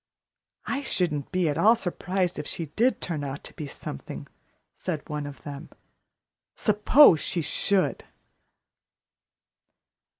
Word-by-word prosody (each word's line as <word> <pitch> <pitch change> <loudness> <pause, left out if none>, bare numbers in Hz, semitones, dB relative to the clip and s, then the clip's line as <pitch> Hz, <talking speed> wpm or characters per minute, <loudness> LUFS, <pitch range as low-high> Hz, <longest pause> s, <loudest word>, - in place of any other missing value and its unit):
"I 275 - -2
shouldn't 165 - -1
be 185 -2 +1
at 150 +1 -1
all 220 +6 +6
surprised 180 -3 -2
if 150 - -5
she 165 - -3
did 245 +4 +2
turn 160 -5 -3
out 140 0 -5
to - - -11
be 150 - -6
something," 70 - -7 0.5
said 165 -5 -4
one 150 -1 -4
of 140 -4 -11
them. 145 +2 -8 0.9
"Suppose 210 - +6
she 170 +1 0
should!" 195 +5 +1
170 Hz, 125 wpm, -26 LUFS, 145-195 Hz, 0.9 s, all